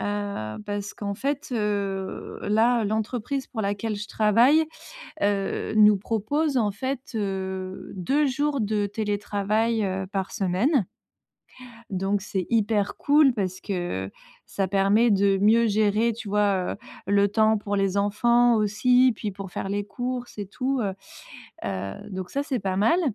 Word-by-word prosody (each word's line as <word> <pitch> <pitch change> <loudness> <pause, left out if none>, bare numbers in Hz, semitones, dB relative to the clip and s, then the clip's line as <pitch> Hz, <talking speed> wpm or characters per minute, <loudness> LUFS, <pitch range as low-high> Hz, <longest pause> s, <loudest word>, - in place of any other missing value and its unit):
Heu, 205 - -3
parce 205 0 -4
qu'en 200 -1 -4
fait, 280 +7 -3
heu, 200 -4 -2
là, 225 +2 +3
l'entreprise 220 +5 -2
pour 225 -4 -4
laquelle 205 +2 -2
je 205 +1 -5
travaille, 235 +11 +4 0.6
heu, 200 0 0
nous 210 -1 +7
propose 265 +9 -1
en 220 -4 +2
fait, 260 +6 -3
heu, 190 -2 -4
2 270 +11 +1
jours 280 +1 0
de 210 -1 0
télétravail, 210 +2 -1
heu, 190 0 -2
par 195 0 -3
semaine. 205 - +1 1.0
Donc, 195 +1 -1
c'est 195 -3 -3
hyper 215 -3 +1
cool, 290 -2 +4
parce 185 -4 -3
que, 175 - -3 0.4
ça 195 -1 -2
permet 200 +4 +3
de 200 -1 +3
mieux 220 +4 +4
gérer, 215 +2 +2
tu 225 -1 -8
vois, 200 -2 +1
heu, - - -7 0.3
le 200 0 +3
temps 220 +1 +3
pour 205 -1 -2
les 195 -1 +1
enfants 235 +4 +3
aussi, 245 +4 +3
puis 210 -1 -4
pour 195 0 -8
faire 195 - -4
les 205 0 -2
courses 245 +1 -5
et 205 - -4
tout, 255 +6 -2
heu 200 -3 -1 0.7
heu, 95 0 -3 0.2
donc 185 -2 -5
ça, 280 +1 -2
c'est 260 -5 -2
pas 190 -1 -2
mal. 230 - +3
205 Hz, 150 wpm, -25 LUFS, 195-235 Hz, 1.0 s, nous